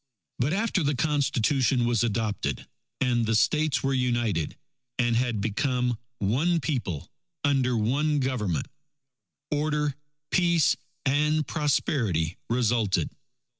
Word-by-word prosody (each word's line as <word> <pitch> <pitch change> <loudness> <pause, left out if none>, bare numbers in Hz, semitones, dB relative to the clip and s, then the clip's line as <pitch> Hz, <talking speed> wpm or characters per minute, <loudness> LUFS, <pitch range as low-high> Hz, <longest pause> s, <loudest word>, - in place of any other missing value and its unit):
But 130 +5 +1
after 205 0 +1
the 145 -1 +1
Constitution 135 -3 +1
was 120 -2 +2
adopted, 105 - -2 0.3
and 120 -3 +2
the 115 - +2
States 150 +7 +2
were 135 0 +1
united 120 - 0 0.4
and 120 -2 +2
had 120 -3 0
became 125 +3 0 0.2
One 145 - +1
People 120 - -3 0.3
under 130 -4 +2
One 145 +8 +1
Government, 105 - -1 0.8
order, 150 -1 0 0.4
peace, 170 -4 +3 0.3
and 150 +2 +2
prosperity 115 - 0
resulted. 115 -8 +1
125 Hz, 105 wpm, -27 LUFS, 115-150 Hz, 0.8 s, peace